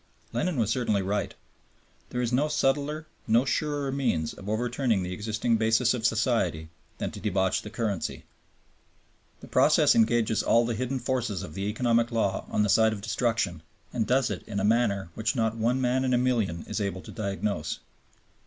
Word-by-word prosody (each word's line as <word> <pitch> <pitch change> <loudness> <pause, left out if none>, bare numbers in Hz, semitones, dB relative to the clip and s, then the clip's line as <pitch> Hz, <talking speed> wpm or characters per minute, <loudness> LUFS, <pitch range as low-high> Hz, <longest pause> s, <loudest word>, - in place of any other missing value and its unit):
Lenin 180 -5 -1
was 110 -2 +1
certainly 110 -5 +1
right. 100 0 -2 0.7
There 125 0 -2
is 120 0 -1
no 140 +4 +3
subtler, 150 +1 0 0.2
no 115 +3 +4
surer 145 0 -1
means 105 - 0
of 100 - -9
overturning 120 -1 0
the 90 0 -4
existing 110 +3 0
basis 115 +2 +3
of 120 -2 +1
society 110 -9 0 0.3
than - - -3
to - - -8
debauch 95 -2 +1
the 105 - -8
currency. 110 -4 -3 1.2
The - - -11
process - - +4
engages 115 -1 +3
all 115 +1 +3
the 120 - -1
hidden 125 +4 -2
forces 120 -7 -2
of 80 -5 -9
economic 115 +4 +1
law 110 -4 0
on 105 - +1
the - - +2
side 110 +2 +4
of 100 - -6
destruction, 110 -5 -1 0.3
and 115 -3 0
does 130 -1 +2
it - - -4
in 100 -2 -3
a - - -1
manner 105 -5 +1
which 110 +6 -1
not 115 -2 +1
one 115 +3 +1
man 130 +1 +1
in 130 -1 +2
a - - +3
million 115 -9 0
is 105 - -3
able 100 -2 -2
to - - -11
diagnose. 100 -5 -2
115 Hz, 180 wpm, -27 LUFS, 100-125 Hz, 1.2 s, no